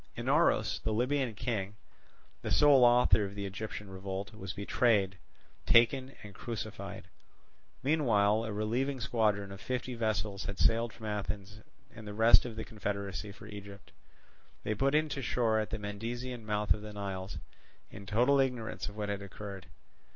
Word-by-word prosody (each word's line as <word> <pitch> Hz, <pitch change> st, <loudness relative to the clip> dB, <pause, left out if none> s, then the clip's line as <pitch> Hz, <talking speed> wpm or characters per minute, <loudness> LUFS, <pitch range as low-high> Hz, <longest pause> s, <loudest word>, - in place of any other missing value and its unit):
Inaros, -, -, +2 dB
the 110 Hz, -, -1 dB
Libyan 125 Hz, 0 st, 0 dB
king, 105 Hz, -2 st, -2 dB, 0.7 s
the -, -, -4 dB
sole 145 Hz, -3 st, +6 dB
author 120 Hz, -4 st, +6 dB
of 100 Hz, 0 st, -5 dB
the 100 Hz, -1 st, -4 dB
Egyptian 105 Hz, +1 st, -5 dB
revolt, 95 Hz, +2 st, -5 dB
was 95 Hz, -4 st, -6 dB
betrayed, 100 Hz, -2 st, +1 dB, 0.5 s
taken, 130 Hz, +3 st, +4 dB
and 105 Hz, -1 st, -10 dB
crucified. 110 Hz, 0 st, -6 dB, 0.8 s
Meanwhile 115 Hz, -7 st, +3 dB
a 110 Hz, -, -4 dB
relieving 120 Hz, +6 st, -1 dB
squadron 105 Hz, -4 st, +1 dB
of 100 Hz, 0 st, -9 dB
fifty 125 Hz, +1 st, -3 dB
vessels 105 Hz, -3 st, -1 dB
had 100 Hz, -, -4 dB
sailed 115 Hz, +1 st, +3 dB
from 110 Hz, -, -11 dB
Athens 105 Hz, 0 st, -4 dB, 0.4 s
and 110 Hz, -2 st, -10 dB
the 105 Hz, -, -6 dB
rest 115 Hz, +3 st, +6 dB
of 120 Hz, -3 st, -5 dB
the 110 Hz, -, -5 dB
confederacy 100 Hz, -1 st, -4 dB
for 100 Hz, -, -13 dB
Egypt. 100 Hz, -1 st, -10 dB, 0.7 s
They 110 Hz, -, 0 dB
put 135 Hz, +6 st, +1 dB
in 155 Hz, +1 st, +3 dB
to 140 Hz, -, -3 dB
shore 115 Hz, -3 st, +1 dB
at 110 Hz, -, -2 dB
the 110 Hz, -, -3 dB
Mendesian 115 Hz, +3 st, -5 dB
mouth 105 Hz, 0 st, +2 dB
of 105 Hz, -, -7 dB
the 105 Hz, 0 st, -8 dB
Nile, 95 Hz, -2 st, -4 dB, 0.6 s
in 100 Hz, 0 st, -10 dB
total 125 Hz, +8 st, +4 dB
ignorance 125 Hz, -6 st, -1 dB
of 105 Hz, -, -13 dB
what 105 Hz, -1 st, -2 dB
had 100 Hz, -1 st, -2 dB
occurred. 100 Hz, -2 st, -8 dB
105 Hz, 160 wpm, -32 LUFS, 100-120 Hz, 0.8 s, sole